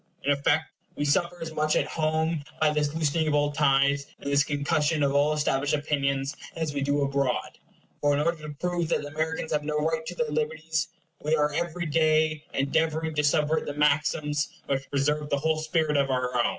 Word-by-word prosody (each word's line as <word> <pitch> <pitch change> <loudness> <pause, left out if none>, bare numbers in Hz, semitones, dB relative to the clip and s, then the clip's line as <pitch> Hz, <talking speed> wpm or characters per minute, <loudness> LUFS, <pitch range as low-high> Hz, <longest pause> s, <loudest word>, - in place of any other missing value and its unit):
In 145 - +2
effect 145 +2 +2 0.3
we 145 - -1
suffer 175 +4 +1
as 160 -1 -6
much 155 0 +1
at - - +2
home 160 0 -1 0.2
by 155 -1 +4
this 150 0 0
loosening 160 0 +1
of 150 - +2
all 145 0 +2
ties, 140 -1 +2
and 140 - -4
this 140 0 +5
concussion 150 +1 0
of 140 -1 +2
all 145 +2 +3
established 145 -1 +1
opinions 140 -1 -1 0.2
as 160 -3 -2
we 140 - -2
do 145 +1 +1
abroad; 140 -2 -1 0.4
for 145 0 +3
in - - 0
order 165 +1 0
to 150 - -7
prove 175 +1 -2
that - - +1
the 145 - -6
Americans 160 +1 -3
have 150 -1 0
no 150 0 -2
right 160 +1 0
to 175 - -5
their 155 -3 -1
liberties, 155 +1 -1 0.4
we 155 +2 +2
are 150 -1 +1
every 170 +2 -2
day 155 -1 +2
endeavoring 160 +3 0
to 150 0 0
subvert 150 +2 +2
the 145 - -4
maxims 150 0 +1 0.2
which 135 -1 -2
preserve 150 +2 0
the 140 - +1
whole 160 +2 0
spirit 155 -1 0
of 140 -1 +2
our 125 -1 -1
own. 120 - +3
150 Hz, 205 wpm, -27 LUFS, 145-160 Hz, 0.4 s, this